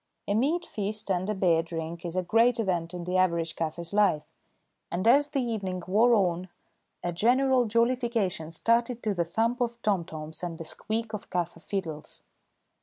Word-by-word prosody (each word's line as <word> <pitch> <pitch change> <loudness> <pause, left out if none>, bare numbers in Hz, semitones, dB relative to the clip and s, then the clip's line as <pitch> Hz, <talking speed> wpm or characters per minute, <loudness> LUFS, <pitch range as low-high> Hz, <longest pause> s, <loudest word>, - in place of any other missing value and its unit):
A 200 - +1
meat 300 +11 +1
feast 210 -2 -3
and 185 +2 0
a 215 - 0
beer 175 -4 +3
drink 165 +1 -6
is 170 - -6
a 185 - +1
great 230 +6 +3
event 175 -6 -1
in 180 -1 -6
the 180 +1 -1
average 170 -3 +1
kaffir's 165 +2 -4
life, 195 -7 +3 0.6
and 185 +5 -1
as 280 +5 +6
the 280 -3 -1
evening 195 -6 -3
wore 225 +6 +4
on 180 -2 0 0.5
a 175 - -1
general 255 +6 +3
jollification 230 -7 +1
started 230 +7 +1
to 215 - +1
the 175 -3 0
thump 230 +8 0
of 235 -1 -1
tomtoms 160 -6 -2
and 175 -2 -4
the 165 - -7
squeak 220 +5 -2
of 210 - -6
kaffir 175 -2 -2
fiddles. 165 -7 -5
195 Hz, 175 wpm, -28 LUFS, 170-230 Hz, 0.6 s, as